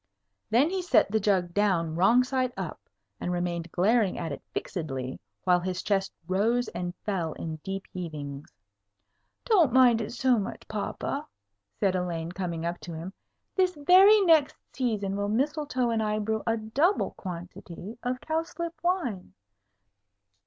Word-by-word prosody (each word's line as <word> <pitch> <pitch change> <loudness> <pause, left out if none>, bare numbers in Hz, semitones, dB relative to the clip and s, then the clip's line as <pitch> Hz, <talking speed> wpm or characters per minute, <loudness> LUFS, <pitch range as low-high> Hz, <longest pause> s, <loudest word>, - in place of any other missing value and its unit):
Then 260 +9 +4
he 380 -1 -1
set 255 - +3
the 220 - +2
jug 190 -4 +1
down 175 -6 +1
wrong 225 +9 +5
side 255 -1 -1
up, - - -5 0.4
and 180 - -2
remained 175 -1 -2
glaring 210 +2 +2
at 165 - -3
it 140 - -6
fixedly, 135 -7 -4 0.2
while 180 -1 +4
his 180 0 -3
chest 195 -2 0 0.2
rose 225 +6 +1
and 175 +1 -4
fell 175 -6 -1
in 160 -1 -5
deep 195 +5 -5
heavings. 150 -5 -6 1.0
"Don't 360 - +4
mind 245 -2 +5
it 215 - -4
so 245 0 +2
much, 195 - -6
papa," 275 +7 -3 0.5
said 195 -2 +2
Elaine, 170 -2 -2
coming 170 -3 -3
up 170 +1 -2
to 170 - -8
him. 170 +4 -6 0.4
"This 370 -2 +2
very 380 +8 +7
next 325 -6 +4 0.2
season 210 -7 -1
will 205 0 -1
Mistletoe 265 0 0
and 225 -1 +1
I 215 0 0
brew 220 +1 -1
a 225 0 +2
double 275 - +1
quantity 180 +3 -8
of 250 +1 -2
cowslip 330 +1 -3
wine." 255 - -1
205 Hz, 150 wpm, -28 LUFS, 175-255 Hz, 1.0 s, very